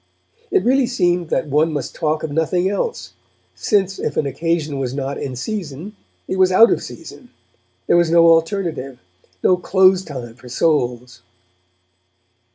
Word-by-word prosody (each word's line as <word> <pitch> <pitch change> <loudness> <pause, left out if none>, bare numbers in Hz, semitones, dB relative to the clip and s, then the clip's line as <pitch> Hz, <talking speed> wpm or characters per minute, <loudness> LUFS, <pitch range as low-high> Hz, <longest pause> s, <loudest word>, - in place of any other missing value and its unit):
It 390 -1 +2
really 260 0 +2
seemed 175 -8 0
that 170 - 0
one 155 +3 +1
must 145 -4 -4
talk 155 -1 -2
of 160 - -4
nothing 170 +4 0
else, 205 - -3 0.4
since 195 -2 0
if 145 - -3
an - - +1
occasion 150 +1 -2
was 130 -1 -3
not 140 0 -4
in 130 -2 -5
season 175 - -6 0.3
it 190 - -3
was 185 0 +4
out 225 +5 +6
of - - 0
season; - - -11 0.6
there - - +3
was 170 -1 +3
no 170 0 +5
alternative, 165 -5 +1 0.5
no 180 - +4
close 190 +1 +3
time 125 -8 -8
for 125 +1 -15
souls. 125 -4 -1
165 Hz, 155 wpm, -19 LUFS, 140-185 Hz, 0.6 s, out